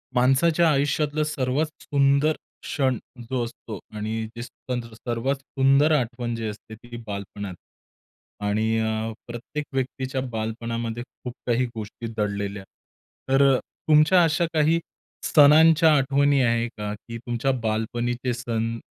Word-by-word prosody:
माणसाच्या 155 Hz, +7 st, +4 dB
आयुष्यातलं 145 Hz, +1 st, +1 dB
सर्वात 145 Hz, -1 st, 0 dB, 0.2 s
सुंदर 140 Hz, +2 st, +3 dB, 0.3 s
क्षण 130 Hz, -4 st, 0 dB, 0.3 s
जो 130 Hz, -2 st, 0 dB
असतो 115 Hz, -3 st, -7 dB, 0.2 s
आणि 110 Hz, +1 st, -2 dB
जे 120 Hz, -, -6 dB
सण 125 Hz, 0 st, -5 dB
सर्वात 120 Hz, +4 st, -2 dB
सुंदर 135 Hz, +3 st, +3 dB
आठवण 120 Hz, -4 st, 0 dB
जी 115 Hz, -1 st, -3 dB
असते 110 Hz, +1 st, -8 dB
ती 120 Hz, +2 st, -10 dB
बालपणात 100 Hz, -1 st, -6 dB, 0.9 s
आणि 110 Hz, +2 st, +1 dB
अ, 110 Hz, 0 st, -1 dB, 0.2 s
प्रत्येक 120 Hz, +5 st, -5 dB
व्यक्तीच्या 130 Hz, 0 st, -2 dB
बालपणामध्ये 115 Hz, +1 st, -3 dB
खूप 125 Hz, -1 st, -10 dB
काही 120 Hz, +1 st, +2 dB
गोष्टी 110 Hz, +1 st, -6 dB
दडलेल्या. 100 Hz, -1 st, -2 dB, 0.7 s
तर 135 Hz, +1 st, +4 dB
अ, -, -, +2 dB, 0.3 s
तुमच्या 155 Hz, +4 st, +6 dB
अशा 165 Hz, +1 st, +2 dB
काही 160 Hz, +1 st, +3 dB, 0.4 s
सणांच्या 160 Hz, +2 st, +6 dB
आठवणी 140 Hz, +1 st, +3 dB
आहे 115 Hz, 0 st, +2 dB
का? 105 Hz, 0 st, -3 dB
की 115 Hz, +2 st, -8 dB
तुमच्या 120 Hz, +3 st, -1 dB
बालपणीचे 120 Hz, +3 st, -1 dB
सण 115 Hz, -1 st, -2 dB
120 Hz, 125 wpm, -24 LUFS, 115-140 Hz, 0.9 s, तुमच्या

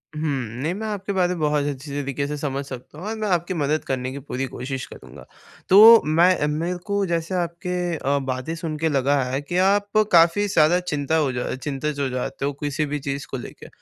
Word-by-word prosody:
हुँ। 150 Hz, -, -4 dB, 0.4 s
नहीं 160 Hz, +5 st, -1 dB
मैं 220 Hz, +3 st, -5 dB
आपकी 200 Hz, -1 st, -3 dB
बातें 180 Hz, -1 st, +1 dB
बहुत 150 Hz, -1 st, +1 dB
अच्छी 140 Hz, 0 st, -5 dB
तरीक़े 140 Hz, +1 st, -3 dB
से 150 Hz, -, -3 dB
समझ 140 Hz, -1 st, -3 dB
सकता 130 Hz, +2 st, -10 dB
हूँ, 185 Hz, -, -6 dB
और 220 Hz, -, -3 dB
मैं 215 Hz, -1 st, -2 dB
आपकी 175 Hz, -1 st, 0 dB
मदद 155 Hz, -1 st, 0 dB
करने 130 Hz, -1 st, -2 dB
की 140 Hz, -, -6 dB
पूरी 135 Hz, -1 st, -4 dB
कोशिश 130 Hz, +1 st, -5 dB
करूँगा। -, -, -13 dB, 0.4 s
तो 220 Hz, +4 st, +9 dB
मैं 165 Hz, +1 st, +3 dB
मेरे 165 Hz, +4 st, -2 dB
को 200 Hz, -1 st, 0 dB
जैसे 170 Hz, +1 st, -2 dB
आपके 175 Hz, 0 st, -2 dB
अ, 140 Hz, 0 st, 0 dB
बातें 130 Hz, +3 st, -3 dB
सुन 160 Hz, -2 st, -4 dB
के 160 Hz, +1 st, 0 dB
लगा 140 Hz, 0 st, +2 dB
है, 130 Hz, +2 st, -2 dB
कि 160 Hz, +5 st, -3 dB
आप 200 Hz, +2 st, +2 dB
काफ़ी 170 Hz, +4 st, +5 dB
ज़्यादा 170 Hz, -1 st, +4 dB
चिंता 160 Hz, -4 st, -2 dB
हो 150 Hz, -4 st, +1 dB
जा 125 Hz, 0 st, -3 dB
चिंतित 145 Hz, +2 st, -4 dB
हो 140 Hz, -, 0 dB
जाते 130 Hz, +2 st, -3 dB
हो 145 Hz, -, -1 dB
किसी 145 Hz, +1 st, -1 dB
भी 145 Hz, 0 st, -3 dB
चीज़ 140 Hz, 0 st, -4 dB
को 135 Hz, -, -2 dB
लेके। 120 Hz, -, -10 dB
150 Hz, 215 wpm, -23 LUFS, 140-180 Hz, 0.4 s, तो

